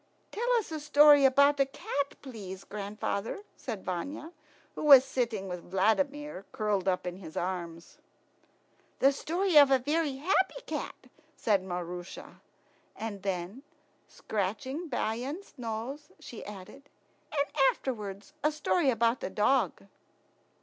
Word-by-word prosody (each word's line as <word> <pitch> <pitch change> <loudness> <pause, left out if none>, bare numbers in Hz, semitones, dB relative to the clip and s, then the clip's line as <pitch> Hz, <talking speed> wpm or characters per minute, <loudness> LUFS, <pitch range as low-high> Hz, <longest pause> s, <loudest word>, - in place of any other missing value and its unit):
"Tell 480 +3 -1
us 455 -8 0
a 315 - -3
story 295 -1 +7
about 280 +2 +5
a 275 - +5
cat, 280 +1 -4
please, 200 -8 -8
grandfather," 210 - -4
said 220 -7 -6
Vanya, 280 - -4 0.4
who - - -6
was 275 -3 +9
sitting 235 -7 -2
with 180 -1 -7
Vladimir 275 +6 0
curled 205 -3 0
up 185 -1 +1
in 180 0 -4
his 165 -5 -10
arms. 170 -2 -5 1.0
"The 275 - +5
story 340 +5 +1
of 285 -2 +7
a 270 - +5
very 295 +2 0
happy 380 - +1
cat," - - -5 0.3
said 200 -4 +1
Maroosia; 180 -1 -7 0.5
and 215 -3 -5
then, 190 +5 -3 0.5
scratching 260 - -3
Bayan's 260 - -3
nose, 245 +4 -5
she 235 - -9
added, 210 +8 -11 0.4
"and 285 -1 -1 0.2
afterwards 210 +1 -5
a 300 - +3
story 305 0 +1
about 230 0 +1
a - - -2
dog." 210 - +1
245 Hz, 130 wpm, -30 LUFS, 195-290 Hz, 1.0 s, was